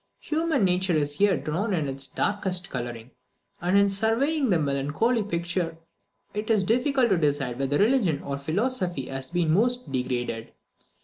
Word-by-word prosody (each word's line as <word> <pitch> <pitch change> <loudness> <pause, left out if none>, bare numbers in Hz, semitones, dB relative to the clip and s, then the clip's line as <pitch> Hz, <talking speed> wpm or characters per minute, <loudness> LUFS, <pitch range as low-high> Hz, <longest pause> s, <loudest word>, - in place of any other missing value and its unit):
Human 310 -7 +1
nature 180 -1 +1
is 145 -1 -1
here 200 -2 +4
drawn 185 +7 -1
in 155 -4 -1
its 135 0 -2
darkest 190 -3 -1
colouring; 120 -1 -5 0.5
and 180 +3 +2
in 200 0 +5
surveying 230 +8 +1
the 180 - +4
melancholy 145 - 0
picture, 170 -3 -2 0.6
it 210 +2 -4
is 215 -3 +3
difficult 250 +4 +2
to 190 -4 +3
decide 140 -5 0
whether 135 +1 +1
religion 205 - +2
or 140 0 -4
philosophy 180 - -1
has 135 0 -5
been 170 -3 +1
most 245 - +1
degraded. 120 -3 -3
180 Hz, 150 wpm, -26 LUFS, 140-220 Hz, 0.6 s, in